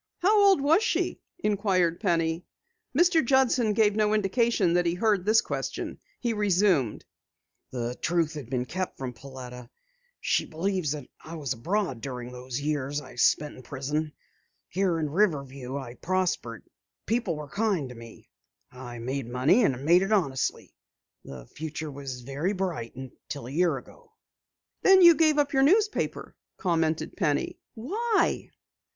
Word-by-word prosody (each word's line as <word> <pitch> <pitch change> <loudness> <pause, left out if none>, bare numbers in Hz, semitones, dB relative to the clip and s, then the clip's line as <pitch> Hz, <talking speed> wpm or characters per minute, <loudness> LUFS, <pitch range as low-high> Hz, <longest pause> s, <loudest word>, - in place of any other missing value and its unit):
"How 405 +3 +5
old 385 -7 +5
was 315 +8 +4
she?" 445 - -1 0.2
inquired 195 - +1
Penny. 165 -3 0 0.5
Mr. 345 -1 +4
Judson 250 -3 +3
gave 210 -1 +3
no 215 0 +2
indication 210 -2 +2
that 175 0 +2
he 170 - +1
heard 205 -1 +1
the 220 +1 +5
question. - - -4 0.2
He 235 -2 -1
resumed: 190 - +2 0.6
"The 120 -1 -3
truth 165 -1 +1
had 145 -6 -8
been 125 -1 -1
kept 185 +7 -4
from 130 -2 -5
Pauletta. 125 -2 -10 0.5
She - - +1
believes 175 -2 -1
that 145 -4 -7 0.2
I 165 - -8
was 140 -5 -2
abroad 150 - -2
during 125 -1 -6
those 125 +1 -5
years 145 -1 -2
I 130 -4 -12
spent 145 +4 +2
in - - -10
prison. 145 +4 -3 0.6
Here 185 -2 +1
in 155 -2 -1
Riverview 140 -7 -1
I 130 -4 -7
prospered, 170 - -2 0.4
people 225 -7 0
were 150 -1 -7
kind 200 -5 0
to - - -8
me. 115 -1 -13 0.4
I 125 -1 -9
made 125 +1 -4
money 130 - +3
and 135 -6 0
made 175 +3 +6
it 195 +2 -1
honestly. 155 -11 0 0.5
The 65 -3 -10
future 155 - -6
was 135 -2 -7
very 140 +10 -2
bright 175 - -3
until 130 +1 -8
a 125 - -7
year 165 -1 +2
ago." 125 - -15 0.7
"Then 385 -1 +7
you 340 -1 +10
gave 310 -2 +3
up 290 -1 +1
your 270 - +4
newspaper," 415 +9 +1 0.2
commented 165 -4 0
Penny. 150 -7 -1 0.2
"Why?" 415 - 0
165 Hz, 150 wpm, -27 LUFS, 130-210 Hz, 0.7 s, you